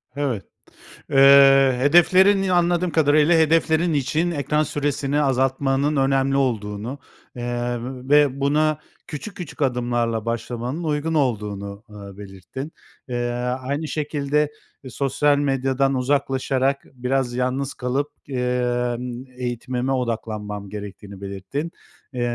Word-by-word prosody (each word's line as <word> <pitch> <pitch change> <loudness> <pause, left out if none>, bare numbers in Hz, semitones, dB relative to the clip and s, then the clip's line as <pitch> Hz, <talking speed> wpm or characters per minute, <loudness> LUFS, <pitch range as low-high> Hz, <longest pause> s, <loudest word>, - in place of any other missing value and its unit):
Evet. 135 -8 -2 0.7
Eee, 135 -1 +7
hedeflerin 185 +7 +5
Ya, 185 -2 +1
anladığım 175 0 +2
kadarıyla, 155 +1 +4
hedeflerin 160 +1 +3
için 155 +5 0
ekran 150 0 0
süresini 145 -1 -1
azaltmanın 135 +1 +1
önemli 135 0 +2
olduğunu, 115 0 -2 0.4
eee, 120 0 -2 0.3
ve 145 -2 +4
buna 150 +2 +2 0.3
küçük 200 +8 -7
küçük 175 -4 -8
adımlarla 120 -4 0
başlamanın 120 +6 -3
uygun 155 +1 -1
olduğunu, 105 -8 -2
ııı, 100 -2 -11
belirttin. 105 - -8 0.4
Eee, 120 -1 -2 0.3
aynı 140 +4 -3
şekilde, 150 -1 -1 0.3
eee, 130 - -8
"Sosyal 140 +3 +1
medyadan 135 -1 +1
uzaklaşarak 135 0 0
biraz 130 0 -1
yalnız 130 +2 -1
kalıp, 130 +3 -2 0.2
eee, 125 -2 -1 0.3
ımm, 125 +1 -6
eğitimime 125 +1 -3
odaklanmam 110 -5 -3
gerek."tiğini 100 -1 -9
belirttin. 100 - -5 0.4
Eee, 125 - -3
135 Hz, 110 wpm, -22 LUFS, 120-145 Hz, 0.7 s, Eee